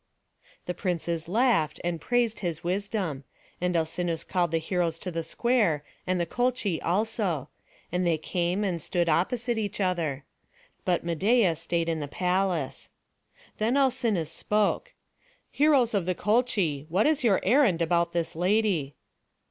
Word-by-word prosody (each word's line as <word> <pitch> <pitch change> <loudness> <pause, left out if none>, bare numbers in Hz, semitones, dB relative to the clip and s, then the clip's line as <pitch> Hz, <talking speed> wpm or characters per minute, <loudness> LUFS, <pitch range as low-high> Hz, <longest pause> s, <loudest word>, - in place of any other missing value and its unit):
The 180 - -2
princes 170 -2 -2
laughed, 205 - +2
and 170 -1 -2
praised 240 -2 +1
his 170 -4 -3
wisdom; 185 -5 -2 0.4
and 180 0 0
Alcinous 165 0 -1
called 175 -2 0
the 165 - +1
heroes 165 0 -1
to 180 - -5
the 165 0 -2
square, 185 - +1 0.2
and 185 0 +1
the 170 - +1
Colchi 245 -4 0
also; 185 - -1 0.4
and 180 +1 0
they 170 -2 +2
came 175 +5 -1
and 180 -5 -1
stood 175 +2 0
opposite 230 +8 +1
each 210 -1 -3
other; 165 -7 -1 0.6
but 175 -2 +1
Medeia 185 +2 +3
stayed 165 +1 -1
in 165 -1 -1
the 145 - -4
palace. 180 -2 -1 0.7
Then 230 +5 +2
Alcinous 235 - +1
spoke: 210 - 0 0.6
"Heroes 280 -6 +3
of 195 -4 0
the 185 - +1
Colchi, 200 - +1
what 185 +6 +2
is 305 -3 +2
your 210 -6 +4
errand 230 - +4
about 170 0 +1
this 170 -2 -2
lady?" 180 -5 +1
180 Hz, 145 wpm, -27 LUFS, 165-215 Hz, 0.7 s, your